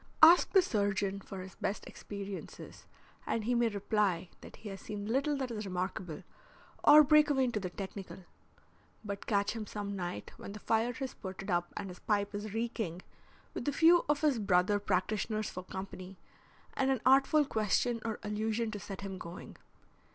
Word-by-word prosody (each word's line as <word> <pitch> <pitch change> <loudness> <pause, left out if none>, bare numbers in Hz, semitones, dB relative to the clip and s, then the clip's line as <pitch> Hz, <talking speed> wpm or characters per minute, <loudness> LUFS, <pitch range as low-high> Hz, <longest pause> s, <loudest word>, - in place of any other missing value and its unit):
Ask 335 +3 +9
the 385 -2 +7
surgeon 200 - 0
for 190 -1 -7
his 185 -1 -9
best 200 - -3
experiences 200 -1 -8 0.4
and 225 - 0
he 240 +3 0
may 240 -1 +3
reply 200 -4 0
that - - -11
he 215 - -9
has 195 -1 -8
seen 205 -1 -6
little 275 +6 +1
that 260 -3 -3
is 215 -2 -4
remarkable, 180 -3 -4 0.6
or 300 +1 +9
break 300 +1 +5
away 270 -2 +3
into 240 -4 0
the 185 -2 -4
technical. 190 0 -7 0.8
But 200 -1 -5
catch 200 -2 +2
him 215 -2 -5
some 200 -1 -4
night 175 - -5
when 200 - -8
the 210 - -8
fire 225 +3 +1
has 265 +1 -4
spurted 190 +1 -7
up 175 0 0
and 205 - -4
his 180 - -10
pipe 205 -1 0
is 205 +1 -4
reeking, 220 -6 -3 0.5
with - - -5
a - - +3
few 330 +4 +6
of 295 -1 +2
his 290 -6 +2
brother 195 0 +3
practitioners 210 +2 -1
for 185 - -6
company 190 0 -8 0.6
and 270 0 +1
an 265 -4 +1
artful 270 +3 +5
question 230 +1 0
or 225 -2 -2
allusion 220 +2 -1
to 210 - -5
set 195 -1 -7
him 195 -2 -6
going. 170 0 -9
210 Hz, 180 wpm, -32 LUFS, 195-240 Hz, 0.8 s, Ask